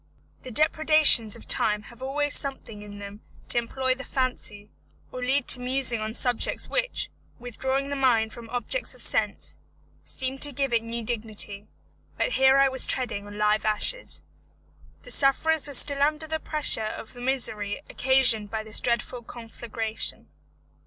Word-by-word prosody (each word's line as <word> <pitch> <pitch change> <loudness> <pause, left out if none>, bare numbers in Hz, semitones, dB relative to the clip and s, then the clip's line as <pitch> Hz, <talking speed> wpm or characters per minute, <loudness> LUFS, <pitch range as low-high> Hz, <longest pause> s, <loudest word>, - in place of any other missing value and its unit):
The 255 - -9
depredations 310 -5 +5
of 230 - -13
time 210 -1 +2
have 235 +2 -15
always 290 +2 -1
something 265 -6 0
in 205 0 -10
them 205 +1 -9 0.3
to 240 - +1
employ 260 +2 -1
the 265 +1 -8
fancy, 225 -6 -3 0.4
or 255 - -6
lead 265 +3 +1
to 250 - +6
musing 250 -2 0
on 215 0 -3
subjects 245 -1 0
which, - - 0 0.3
withdrawing 265 +3 -2
the 285 - -2
mind 235 -5 +2
from 235 -1 -10
objects 245 - -3
of - - -8
sense, - - -1 0.4
seem 265 +1 -3
to 290 - +2
give 275 -1 -2
it 230 - +3
new 230 0 -5
dignity; 215 -3 -4 0.5
but - - 0
here 265 - +5
I 275 0 +6
was 260 -1 +1
treading 205 -6 -1
on 205 0 -9
live 210 0 +2
ashes. 215 - -1 0.8
The - - -6
sufferers 295 +3 +2
were 285 - -5
still 280 +1 +2
under 305 +2 +1
the 315 0 -3
pressure 300 -7 0
of 215 +1 -6
the 245 - -11
misery 240 -6 -1
occasioned 250 -5 +3
by 220 0 -3
this 220 -1 0
dreadful 240 +1 -2
conflagration. 225 -1 -5
245 Hz, 160 wpm, -26 LUFS, 220-275 Hz, 0.8 s, to